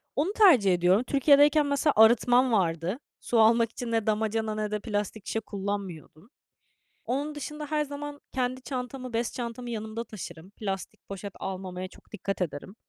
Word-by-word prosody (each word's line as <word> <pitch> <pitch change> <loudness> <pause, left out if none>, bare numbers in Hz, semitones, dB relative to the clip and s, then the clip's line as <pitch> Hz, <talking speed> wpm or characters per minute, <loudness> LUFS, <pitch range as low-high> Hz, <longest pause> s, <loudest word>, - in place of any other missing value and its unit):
Onu 325 +8 0
tercih 275 - +6
ediyorum. 180 +6 +3
Türkiye'deyken 290 +2 +5
mesela 285 +1 +2
arıtmam 245 +3 +5
vardı. 180 - 0 0.2
Su 235 - 0
almak 230 +1 +5
için 240 0 -5
ne 225 -2 0
damacana 220 0 0
ne 215 -1 -2
de 210 - -1
plastik 205 -1 -3
şişe 225 - -1
kullanmıyordum. 200 -3 -6 0.8
Onun 290 +4 -2
dışında 300 +1 -6
her 300 0 0
zaman 290 0 -7
kendi 255 0 -2
çantamı, 255 -1 -5
bez 230 +1 -1
çantamı 240 0 -5
yanımda 220 0 -4
taşırım. 180 -6 -9
Plastik 195 -3 -6
poşet 200 0 -6
almamaya 185 -1 -5
çok - - -20
dikkat 195 -2 -4
ederim. 170 +3 -4
225 Hz, 155 wpm, -28 LUFS, 200-260 Hz, 0.8 s, tercih